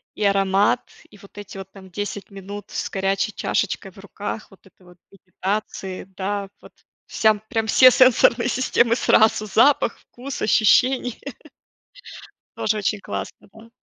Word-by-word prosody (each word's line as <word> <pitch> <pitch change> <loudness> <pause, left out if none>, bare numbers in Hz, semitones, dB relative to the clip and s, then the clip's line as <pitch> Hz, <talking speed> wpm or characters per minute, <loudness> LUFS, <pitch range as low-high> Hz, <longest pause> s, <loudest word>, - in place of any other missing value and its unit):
и 210 - -4
аромат, 200 +3 +2 0.3
и 210 - -17
вот 200 +1 -18
эти 205 -1 -9
вот, 195 0 -9
там, 190 -2 -15
10 205 +1 -6
минут 200 +1 -9
с - - -4
горячей 195 +2 -1
чашечкой 195 -1 -2
в 195 - -17
руках, 205 +2 -7
вот 195 - -21
это 190 -1 -23
вот, 180 0 -18
медитации, 190 0 -5
да, 200 0 -3
вот - - -15 0.4
всям 215 -1 +2
прям 225 -3 -1
все 255 +3 +7
сенсорные 250 -1 +4
системы 240 -2 +2
сразу, 220 -2 +3
запах, 230 +4 +3
вкус, 260 +3 -9
ощущение. 245 +3 +2 1.4
Тоже 215 0 0
очень 210 0 -1
классно, - - -7
да. 220 +1 -16
205 Hz, 145 wpm, -22 LUFS, 195-225 Hz, 1.4 s, все